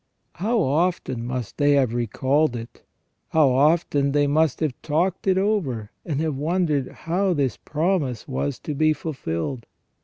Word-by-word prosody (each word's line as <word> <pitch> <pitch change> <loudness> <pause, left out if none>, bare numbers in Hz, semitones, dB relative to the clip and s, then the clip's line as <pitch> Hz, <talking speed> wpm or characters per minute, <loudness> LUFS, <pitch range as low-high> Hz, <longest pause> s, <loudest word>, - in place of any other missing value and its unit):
How 225 +6 +1
often 155 - 0
must 125 -4 -4
they 145 0 +4
have 130 -5 +2
recalled 130 +4 +1
it! 115 0 -8 0.5
How 155 -4 +4
often 140 0 +2
they 145 0 +3
must 150 0 +2
have 155 -5 +1
talked 170 +6 0
it 190 -1 +4
over, 160 - 0
and 150 -4 -2
have 160 -2 0
wondered 155 -3 0
how 185 +3 0
this 135 -6 0
promise 155 - -1
was 70 +2 -2
to 150 - -4
be 155 +2 +3
fulfilled 130 - -4
145 Hz, 150 wpm, -23 LUFS, 130-165 Hz, 0.5 s, they